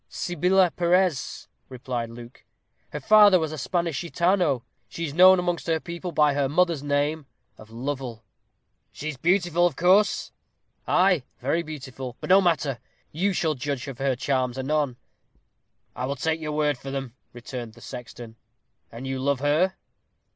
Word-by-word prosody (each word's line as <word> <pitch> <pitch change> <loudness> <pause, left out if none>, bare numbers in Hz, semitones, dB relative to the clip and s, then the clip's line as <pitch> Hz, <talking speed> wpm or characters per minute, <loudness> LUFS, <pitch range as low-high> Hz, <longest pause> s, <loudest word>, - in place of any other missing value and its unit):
"Sibila 180 +1 +2
Perez," 175 -4 0 0.2
replied 125 -2 -4
Luke. 120 +1 -12 0.5
"Her 150 - -5
father 205 +4 +7
was 160 -3 -2
a 155 - -6
Spanish 170 0 -1
Gitano. 170 -6 +1 0.3
She 165 - -4
is 145 - -5
known 185 +3 +7
amongst 175 -1 -2
her 165 -1 +1
people 170 +2 -6
by 150 -2 +3
her 140 -1 0
mother's 170 -1 +2
name 145 +1 -1 0.3
of 110 - -15
Lovel." 125 -1 -5 0.7
"She 155 - -6
is 150 - -6
beautiful, 175 +2 +2
of 165 - -5
course?" 190 +6 +3 0.6
"Ay, 185 -4 +3 0.2
very 140 +6 0
beautiful! 135 -5 -8
but - - -3
no 195 +1 +7
matter! 150 -8 0 0.3
You 190 +6 0
shall 165 -4 0
judge 140 -1 -4
of 135 -2 -8
her 135 -1 +1
charms 130 -1 -1
anon." 135 -1 -1 1.0
"I 125 +1 -3
will 140 - -2
take 160 +4 -1
your 150 -1 -4
word 150 -3 0
for 135 - -8
them," 135 -3 -5 0.2
returned 120 -1 -8
the 120 - -16
sexton; 115 0 -9 0.5
"and 115 +3 -8
you 135 0 -3
love 140 0 0
her?" 155 +6 +2
145 Hz, 160 wpm, -25 LUFS, 130-175 Hz, 1.0 s, father